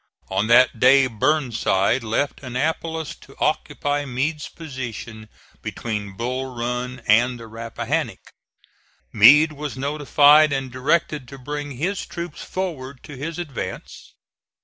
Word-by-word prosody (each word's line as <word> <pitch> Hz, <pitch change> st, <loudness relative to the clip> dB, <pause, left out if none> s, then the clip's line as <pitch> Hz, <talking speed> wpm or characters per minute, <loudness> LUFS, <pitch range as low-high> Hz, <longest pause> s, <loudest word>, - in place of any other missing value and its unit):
On 100 Hz, +3 st, +1 dB
that 120 Hz, 0 st, +5 dB
day 135 Hz, +2 st, +6 dB
Burnside 120 Hz, -3 st, +1 dB
left 115 Hz, +6 st, -1 dB
Annapolis 160 Hz, +4 st, -2 dB
to -, -, -17 dB
occupy 145 Hz, 0 st, -1 dB
Meade's 145 Hz, +3 st, -2 dB
position 120 Hz, -7 st, -8 dB, 0.3 s
between 105 Hz, -4 st, -5 dB
Bull 130 Hz, +3 st, -3 dB
Run 125 Hz, +1 st, -3 dB
and 120 Hz, +3 st, +3 dB
the 115 Hz, -, -9 dB
Rappahannock. 115 Hz, 0 st, -4 dB, 0.8 s
Meade 150 Hz, +9 st, +7 dB
was 145 Hz, -2 st, -6 dB
notified 145 Hz, +2 st, +5 dB
and 135 Hz, -2 st, -2 dB
directed 145 Hz, +1 st, 0 dB
to 140 Hz, -, -10 dB
bring 145 Hz, +2 st, -5 dB
his 180 Hz, +9 st, -2 dB
troops 170 Hz, -2 st, -7 dB
forward 140 Hz, -9 st, -5 dB
to 150 Hz, -, -10 dB
his 155 Hz, +5 st, -5 dB
advance. 140 Hz, -, -7 dB
130 Hz, 120 wpm, -22 LUFS, 120-150 Hz, 0.8 s, Meade